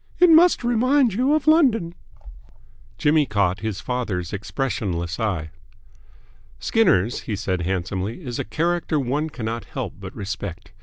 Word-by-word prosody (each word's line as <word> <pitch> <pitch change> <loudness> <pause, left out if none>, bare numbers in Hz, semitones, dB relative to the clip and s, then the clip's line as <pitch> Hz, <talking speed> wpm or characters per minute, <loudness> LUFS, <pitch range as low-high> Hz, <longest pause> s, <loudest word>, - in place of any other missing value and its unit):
"It 355 -1 +6
must 335 -2 +6
remind 245 +1 +3
you 260 +8 +2
of 310 - -1
London." 255 - +3 1.0
Jimmy 150 -1 +3
caught 100 -3 +1
his 110 -2 -4
father's 105 -8 -3
expressionless 100 -6 -3
eye. 90 -8 -2 1.1
"Skinner's," 120 - +2
he 105 - 0
said 95 -3 -2
handsomely, 95 - -3
"is 120 -2 -4
a - - 0
character 165 - -1
one 145 +4 -1
cannot 115 -4 -4
help - - -5
but - - -9
respect. 100 -3 -6
120 Hz, 135 wpm, -23 LUFS, -, 1.1 s, It